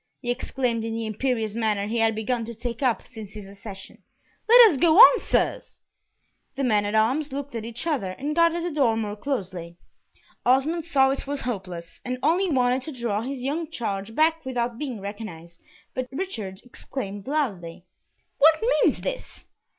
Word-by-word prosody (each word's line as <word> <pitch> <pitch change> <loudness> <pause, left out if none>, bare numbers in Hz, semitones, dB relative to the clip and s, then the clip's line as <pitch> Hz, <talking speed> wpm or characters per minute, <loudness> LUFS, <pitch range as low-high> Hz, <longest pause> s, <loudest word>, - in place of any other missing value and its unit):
he 245 - -2
exclaimed 245 -2 -1
in 225 0 -3
the 225 0 -3
imperious 220 0 -1
manner 215 -3 0
he 225 +3 -2
had 225 -1 +2
begun 230 +2 -1
to 235 +1 -7
take 235 +2 -5
up 250 -4 +1
since 220 -5 -10
his 210 -3 -9
accession. 195 -1 -10 0.5
"Let 475 -2 +9
us 290 - -2
go 335 -1 +4
on, - - +10
sirs." - - -1 0.8
The 275 - -2
men 210 -5 +2
at 205 +1 -2
arms 260 +8 +2
looked 280 0 -5
at 225 -2 -4
each 235 +5 -6
other, 280 - -1
and 290 +8 -4
guarded 335 0 +3
the 350 - -2
door 260 -7 +2
more 210 -2 -3
closely. 185 -9 -4 0.7
Osmond 295 +6 +2
saw 270 -5 +3
it 275 - -4
was 285 0 -3
hopeless, 185 -8 -6
and 250 0 -3
only 350 +6 +2
wanted 255 -2 +2
to 310 - -7
draw 215 -3 -1
his 260 +1 -5
young 305 +4 -2
charge 220 -6 -4
back 320 +1 +2
without 245 -2 -2
being 260 -7 -4
recognised, 185 -5 -8 0.3
but 255 -1 -3
Richard 225 - -5
exclaimed 205 -5 -7
loudly, 190 - -2 0.5
"What 315 +2 +6 0.2
means - - +2
this?" - - -6
240 Hz, 175 wpm, -25 LUFS, 210-285 Hz, 0.8 s, on